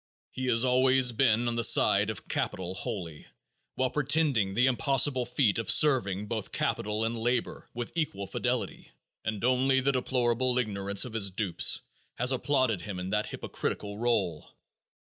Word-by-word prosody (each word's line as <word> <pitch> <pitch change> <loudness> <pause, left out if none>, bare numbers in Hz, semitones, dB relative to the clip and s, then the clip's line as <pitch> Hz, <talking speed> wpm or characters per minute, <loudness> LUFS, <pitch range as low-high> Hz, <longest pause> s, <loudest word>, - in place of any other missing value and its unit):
He 130 0 -4
has 120 0 +2
always 130 0 +3
been 120 0 +2
on 120 - 0
the 115 0 -1
side - - +4
of - - -7
capital 90 -1 -3
wholly, 85 -5 -6 0.5
while 130 -1 0
pretending 140 -9 +1
the 125 - +3
impossible 130 0 +1
feat 125 -4 +1
of 115 - -4
serving 105 -10 +3
both 110 -1 -5
capital 105 +2 -1
and 115 +1 -2
labor 120 +1 -2
with 120 -1 -5
equal 145 - -3
fidelity, - - -3 0.3
and 110 -2 -4
only 130 +2 +2
the 135 +1 +1
deplorable 125 -1 0
ignorance 100 -3 0
of 125 - -9
his 105 -3 +1
dupes 95 -2 +2 0.3
has 125 +2 +1
applauded 130 -6 0
him 95 0 -6
in 90 +1 -5
that 105 0 0
hypocritical 105 0 -5
role. 100 -10 -1
120 Hz, 155 wpm, -28 LUFS, 105-130 Hz, 0.5 s, side